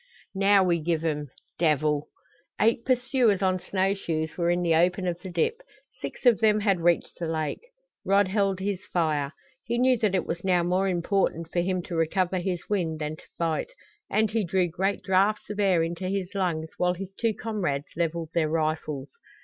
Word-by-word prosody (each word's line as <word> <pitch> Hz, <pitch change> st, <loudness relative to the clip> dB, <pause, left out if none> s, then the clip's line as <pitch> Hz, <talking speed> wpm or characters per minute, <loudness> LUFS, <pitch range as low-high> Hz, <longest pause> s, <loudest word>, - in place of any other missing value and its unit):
"Now 195 Hz, 0 st, +4 dB
we 175 Hz, -2 st, +2 dB
give 165 Hz, 0 st, -1 dB
'em 150 Hz, -3 st, -1 dB, 0.3 s
devil!" 150 Hz, -2 st, +2 dB, 0.5 s
Eight 230 Hz, +2 st, +3 dB
pursuers 250 Hz, -6 st, +2 dB
on 185 Hz, -1 st, +2 dB
snow 190 Hz, +1 st, 0 dB
shoes 160 Hz, -5 st, -3 dB
were 170 Hz, -1 st, 0 dB
in 175 Hz, 0 st, +1 dB
the 170 Hz, -1 st, +3 dB
open 180 Hz, +3 st, +2 dB
of 175 Hz, -1 st, -2 dB
the 190 Hz, -, -7 dB
dip. 460 Hz, -, 0 dB, 0.4 s
Six -, -, -7 dB
of 240 Hz, -4 st, +6 dB
them 215 Hz, -1 st, +3 dB
had 195 Hz, -3 st, +2 dB
reached 170 Hz, 0 st, +1 dB
the 170 Hz, -, -2 dB
lake. 155 Hz, -2 st, -2 dB, 0.4 s
Rod 200 Hz, 0 st, +3 dB
held 195 Hz, -1 st, +1 dB
his 195 Hz, -1 st, -2 dB
fire. 150 Hz, -5 st, 0 dB, 0.3 s
He 235 Hz, 0 st, -2 dB
knew 255 Hz, 0 st, +3 dB
that 210 Hz, -3 st, +1 dB
it 185 Hz, -, 0 dB
was 170 Hz, +1 st, -4 dB
now 180 Hz, -2 st, +3 dB
more 180 Hz, +3 st, +1 dB
important 175 Hz, -2 st, 0 dB
for 175 Hz, -, 0 dB
him 180 Hz, 0 st, 0 dB
to 170 Hz, -, -6 dB
recover 180 Hz, +3 st, +1 dB
his 180 Hz, -1 st, -3 dB
wind 175 Hz, -6 st, -1 dB
than 155 Hz, 0 st, -4 dB
to -, -, -17 dB
fight, 170 Hz, -, -1 dB, 0.4 s
and 215 Hz, 0 st, +2 dB
he 225 Hz, -1 st, +1 dB
drew 180 Hz, 0 st, +1 dB
great 190 Hz, +5 st, -1 dB
drafts 195 Hz, +3 st, +2 dB
of 210 Hz, -, -6 dB
air 185 Hz, -5 st, +3 dB
into 170 Hz, +2 st, -3 dB
his 195 Hz, -1 st, -3 dB
lungs 170 Hz, -5 st, -1 dB
while 180 Hz, 0 st, +1 dB
his 195 Hz, +1 st, -7 dB
two 225 Hz, +1 st, 0 dB
comrades 175 Hz, -11 st, -2 dB
leveled 165 Hz, -1 st, -1 dB
their 160 Hz, -3 st, +1 dB
rifles. 155 Hz, -3 st, -2 dB
180 Hz, 190 wpm, -26 LUFS, 165-200 Hz, 0.5 s, of